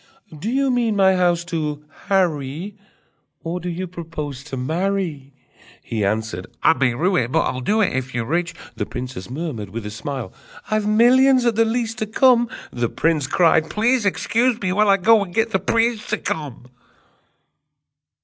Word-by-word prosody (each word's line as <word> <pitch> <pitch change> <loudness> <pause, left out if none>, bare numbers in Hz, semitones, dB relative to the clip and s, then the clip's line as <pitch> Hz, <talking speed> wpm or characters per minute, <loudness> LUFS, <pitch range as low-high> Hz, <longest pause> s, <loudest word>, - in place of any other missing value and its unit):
Do 160 +9 -4
you 270 +2 +1
mean 235 -3 +1
my 190 -1 +4
house 175 -2 +2
to 150 -4 -3 0.2
harry, 175 0 0 0.7
Or 170 +2 -3
do 180 +1 -5
you 180 +2 -3
propose 155 -6 -7
to 135 -2 -6
marry?" 160 0 -2 0.5
He 110 -3 -3
answered: 100 -3 -2 0.2
"I - - +6
may 130 -6 +1
rue 180 +8 +1
it, 120 0 0
But - - +3
I'll 130 - -2
do 210 - +1
it, 195 - +1
If 130 -1 -3
you're 120 -2 -1
rich!" 170 +4 -1 0.2
The - - -3
princess 125 -6 -6
murmured 130 - -5
with 110 +2 -6
a 105 - -5
smile: 120 0 -5 0.4
"I've 215 -1 +1
millions, 250 +4 +5
at 235 - +3
the 225 +1 +3
least, 225 0 -2
to 215 - -2
come!" 240 +1 +4 0.2
The 120 -2 -1
prince 155 -5 0
cried: 160 0 +3
"Please 235 +3 +1
excuse 230 +4 +1
me, 185 -3 -1
while 210 +1 +3
I 195 - +5
go 215 +2 +4
and 175 -3 -10
get 225 0 +1
the - - +1
priest 230 -1 0
to 215 - 0
come!" 145 -10 -5
175 Hz, 180 wpm, -21 LUFS, 135-215 Hz, 0.7 s, I